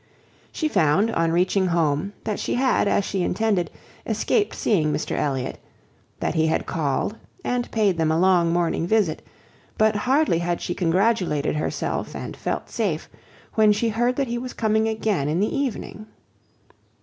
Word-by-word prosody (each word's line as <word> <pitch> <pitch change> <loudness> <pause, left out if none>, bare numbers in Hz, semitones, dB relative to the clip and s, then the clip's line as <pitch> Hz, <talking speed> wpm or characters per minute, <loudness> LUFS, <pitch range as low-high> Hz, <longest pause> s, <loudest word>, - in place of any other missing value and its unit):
She 315 - -1
found, 195 - +2
on 165 -6 +1
reaching 185 +2 +2
home, 165 +2 0
that 215 - -2
she - - -1
had, 255 -4 +2
as 200 - +2
she 190 - -2
intended, 195 0 0 0.3
escaped 415 -2 0
seeing 160 -8 +1
Mr - - -3
Elliot; 135 -3 -2 0.6
that - - -1
he 160 -1 +2
had 160 - 0
called 160 +7 -1 0.3
and 245 -1 -1
paid 205 -6 +1
them 160 -1 +2
a 160 - +2
long 175 -2 +4
morning 170 -1 0
visit; 205 -6 +1 0.6
but 215 0 +3
hardly 260 - +2
had 175 0 -1
she 175 - -3
congratulated 180 -4 +1
herself, 150 - -2
and - - -6
felt - - -3
safe, - - -2 0.4
when 215 -1 +5
she 225 +3 +1
heard 240 +3 +1
that 275 - 0
he 240 0 -2
was 250 +1 -6
coming 220 0 +1
again 215 -9 0
in 160 +3 0
the 210 +7 0
evening. 250 -5 -3
195 Hz, 160 wpm, -23 LUFS, 165-225 Hz, 0.6 s, when